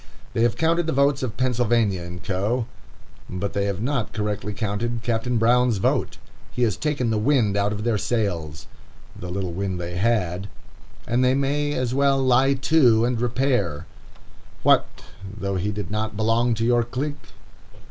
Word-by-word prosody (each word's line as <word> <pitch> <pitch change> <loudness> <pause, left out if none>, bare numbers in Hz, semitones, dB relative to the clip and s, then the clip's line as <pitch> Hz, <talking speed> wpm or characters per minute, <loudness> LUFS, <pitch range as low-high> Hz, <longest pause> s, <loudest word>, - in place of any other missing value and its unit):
They - - 0
have 120 -1 +2
counted 165 +1 +1
the 160 - 0
votes 140 +1 +2
of 125 -4 -4
Pennsylvania 115 -8 +1
& - - -18
Co., 105 +6 -1 0.6
but 95 +2 -3
they 100 0 0
have 100 +1 -2
not 130 -4 -1
correctly 105 -1 -2
counted 110 +3 -2
Captain 120 +1 0
Brown's 120 0 +3
vote. 95 - 0 0.3
He 125 - -1
has 110 -5 +2
taken 140 -5 -1
the 110 - +1
wind 115 -4 +2
out 100 +1 +1
of 105 0 -4
their 115 -3 +1
sails, 85 -11 -2 0.5
the 90 - -7
little 90 -1 -3
wind 95 0 -3
they 85 0 -5
had, 100 -3 0 0.6
and 120 +2 +1
they 130 +1 +3
may 145 +2 0
as 130 -3 -1
well 140 0 +3
lie 130 +1 +3
to 130 -5 +4
and 120 -1 -1
repair. 120 - 0 0.8
What - - +5 0.5
though 100 -1 -2
he 100 +4 -1
did 105 -3 -5
not 110 0 -2
belong 115 +2 +2
to 115 +1 -1
your 120 0 +3
clique! 140 +5 -5
115 Hz, 170 wpm, -23 LUFS, 100-130 Hz, 0.8 s, What